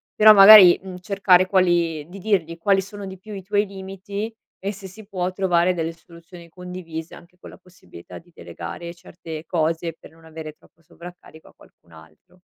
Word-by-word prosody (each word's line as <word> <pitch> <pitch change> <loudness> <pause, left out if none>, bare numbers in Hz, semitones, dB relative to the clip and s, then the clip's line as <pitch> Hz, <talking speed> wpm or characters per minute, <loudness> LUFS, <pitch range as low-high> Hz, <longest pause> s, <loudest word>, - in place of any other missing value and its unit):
però, 215 0 +7
magari, 195 -2 +9
mhmm, 185 -1 -10
cercare 185 -1 +2
quali 170 -5 0
di 195 +2 -11
dirgli 175 -5 -1
quali 195 +3 +1
sono 200 +1 -10
di 190 0 -9
più 215 +2 -11
i 195 - -7
tuoi 205 +2 0
limiti 195 +3 -7 0.3
e 200 +1 -4
se 195 -1 -11
si 200 +2 -15
può 185 -2 -3
trovare 180 -2 +1
delle 165 -1 -4
soluzioni 170 +1 -16
condivise, 180 -2 -9
anche 180 +1 -18
con - - -13
la - - -15
possibilità 180 - -15
di 175 +1 -24
delegare 85 - -9
certe 165 -2 -11
cose 165 0 -2
per - - -16
non 165 0 -22
avere 160 -1 -10
troppo 165 +2 -28
sovraccarico 170 -1 -15
a - - -23
qualcun 85 - -24
altro. 80 - -20
180 Hz, 180 wpm, -21 LUFS, 165-195 Hz, 0.3 s, magari